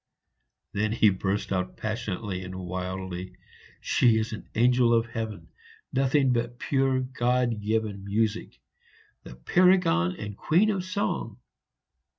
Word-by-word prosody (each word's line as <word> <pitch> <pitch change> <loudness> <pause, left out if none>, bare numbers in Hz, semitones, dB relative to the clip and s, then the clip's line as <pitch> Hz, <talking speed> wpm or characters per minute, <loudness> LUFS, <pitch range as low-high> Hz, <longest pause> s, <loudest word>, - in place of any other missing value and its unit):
Then 105 +2 0
he 110 -2 +5
burst 95 +2 -2
out 90 -1 -2
passionately 105 -3 -3
and 95 0 -7
wildly, 95 0 -5 0.5
"She 115 -3 +3
is 110 0 -2
an 110 - -8
angel 120 0 +4
of 115 0 +2
heaven, 110 -7 -6 0.4
nothing 135 0 +3
but 120 0 -2
pure 135 0 +1
God 125 -3 0
given 105 -2 -1
music! 110 +2 -1 0.6
the 60 - -11
paragon 175 - +3
and 105 -1 -6
queen 185 - +3
of 190 -3 -2
song!" 185 +2 -2
110 Hz, 125 wpm, -27 LUFS, 95-125 Hz, 0.6 s, he